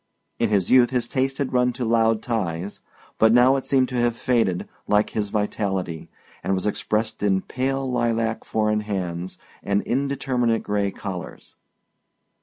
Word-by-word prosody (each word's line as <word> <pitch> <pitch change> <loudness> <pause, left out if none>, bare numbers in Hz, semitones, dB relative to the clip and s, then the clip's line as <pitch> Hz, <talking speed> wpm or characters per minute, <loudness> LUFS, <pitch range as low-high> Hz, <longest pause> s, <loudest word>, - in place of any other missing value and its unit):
In 115 - +2
his 100 -4 +1
youth 125 -2 +6
his 125 -2 -1
taste 135 +1 -1
had 140 -2 -2
run 125 0 +2
to 125 - -3
loud 115 -1 +2
ties, 100 -5 -3 0.4
but 110 0 +6
now 125 +3 +6
it 135 - -2
seemed 130 -2 +3
to 125 - -5
have 120 -1 +1
faded, 115 -8 +1 0.2
like 105 0 +2
his 105 -2 -2
vitality, 95 -5 -2 0.3
and 95 - +1
was 95 - -2
expressed 110 +1 -1
in 95 -2 +2
pale 135 +1 -2
lilac 115 -2 0
four 110 -1 0
in 105 - +1
hands 95 -4 -4 0.2
and 100 0 0
indeterminate 130 -3 0
gray 100 -1 0
collars. 95 -3 -7
110 Hz, 160 wpm, -23 LUFS, 100-125 Hz, 0.4 s, youth